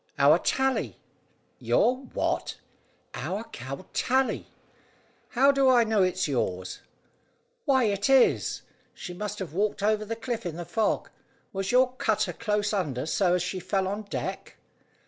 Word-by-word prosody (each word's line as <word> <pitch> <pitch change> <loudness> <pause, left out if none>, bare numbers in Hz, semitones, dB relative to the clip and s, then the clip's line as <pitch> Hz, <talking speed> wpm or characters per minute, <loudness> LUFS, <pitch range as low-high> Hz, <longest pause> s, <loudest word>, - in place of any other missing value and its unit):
"Our 150 +4 +6
Tally." 265 +5 0 0.6
"Your 250 - +3
what?" 260 0 -3 0.6
"Our 205 +4 -3
cow, 135 - -8
Tally." 260 +1 +1 0.8
"How 275 +3 +5
do 275 -1 +3
I 245 -2 +6
know 220 -2 +2
it's 185 -1 +1
yours?" 95 -9 -2 0.9
"Why, 265 -3 +4
it 205 +1 0
is. 270 -2 +3 0.3
She 180 - -7
must 210 +3 -5
have 185 -6 -6
walked 205 +2 -1
over 215 0 +2
the 225 +2 -4
cliff 230 0 -4
in 175 -4 -4
the 175 0 -6
fog. 220 +5 -1 0.4
Was 195 0 -2
your 250 0 +4
cutter 220 -4 0
close 210 -2 -1
under 150 -11 -1
so 180 +2 +2
as 180 - 0
she 185 +1 -3
fell 190 +1 -1
on 205 +2 -3
deck?" 205 - -5
205 Hz, 145 wpm, -27 LUFS, 180-240 Hz, 0.9 s, Our